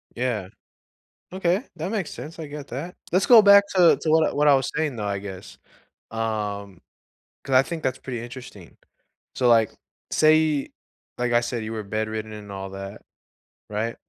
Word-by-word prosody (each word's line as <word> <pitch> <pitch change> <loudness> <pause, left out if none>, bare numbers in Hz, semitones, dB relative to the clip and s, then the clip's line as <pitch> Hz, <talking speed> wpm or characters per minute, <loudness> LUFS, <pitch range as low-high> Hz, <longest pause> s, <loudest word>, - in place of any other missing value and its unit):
Yeah. 115 -6 -2 0.8
Okay, 185 +5 0
that 170 +5 -4
makes 200 -7 -2
sense, 160 +2 -9
I 160 - -6
get 145 -1 -8
that. 160 +8 -6 0.2
Let's 185 +2 +2
go 230 -3 +9
back 200 0 +8
to 180 -3 +6
to 155 - -1
what 160 -2 +3
what 150 +1 +3
I 140 - +7
was 135 -2 +1
saying, 150 -5 -1
though, 105 - -4
I 100 -1 -1
guess. 95 -2 -9 0.5
Um, 105 -4 -3 0.6
'cause 135 - -1
I 130 - +8
think 165 0 -6
that's 130 -1 -1
pretty 120 -3 -6
interesting. 120 -7 -11 0.6
So, 125 -2 +2
like, 115 -2 +5 0.4
say 155 -2 +3 0.5
like, 120 0 0
I 120 - +5
said, 120 -1 -3
you 110 - -5
were 110 -1 -4
bedridden 110 +1 -4
and 105 -1 -9
all 95 0 -6
that. 95 0 -8 0.7
Right? 110 +2 -2
125 Hz, 175 wpm, -24 LUFS, 110-155 Hz, 0.8 s, go